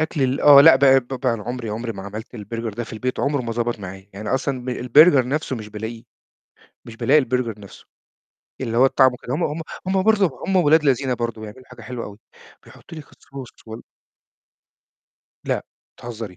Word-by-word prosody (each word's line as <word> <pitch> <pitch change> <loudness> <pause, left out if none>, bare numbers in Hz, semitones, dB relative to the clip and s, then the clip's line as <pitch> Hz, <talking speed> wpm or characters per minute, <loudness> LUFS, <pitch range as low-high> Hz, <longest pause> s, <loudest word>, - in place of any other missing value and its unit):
أكل 155 -2 -1
ال 130 +1 0
آه، 145 -1 +8
لأ، 145 -2 +8
ب 140 - +1 0.4
ب 135 - -4
عُمري 120 +1 -3
عُمري 115 +2 -4
ما 95 - -9
عملت 110 +5 -9
البرجر 115 +1 -6
ده 120 +2 -4
في - - -12
البيت، 125 +4 -3
عُمره 140 -2 0
ما 115 - -4
ضبط 120 -1 -2
معايا. 95 0 -9
يعني 105 +2 -7
أصلًا 130 -1 -2
ب - - -7
البرجر 130 +2 +4
نفسه 145 -2 -2
مش 110 -1 -8
بالاقيه، 110 +2 -7 0.8
مش 115 - -11
بالاقي 145 +6 +3
البرجر 125 -5 -2
نفسه. 100 - -14 0.7
اللي 115 -3 -3
هو 130 - +6
الطعم 130 -1 +4
وكده 125 +1 -6
هم 170 - -2
هم 150 +2 -3 0.3
هم 190 0 +1
برضه 205 -3 +3 0.2
هم 190 0 0
ولاد 160 -2 +4
لذينَ 135 -1 +1
برضه 115 -2 -4
بيعملوا 110 +4 -11
حاجة 125 -2 -14
حلوة 120 +1 -6
أوي 100 0 -11 0.5
بيحطوا 165 - -13
لِك 145 - -13
الصوص 135 -3 -11 0.2
وال 110 +1 -9 1.6
لأ، - - -2 0.3
بتهزري! 115 -2 -7
125 Hz, 185 wpm, -21 LUFS, 115-140 Hz, 1.6 s, آه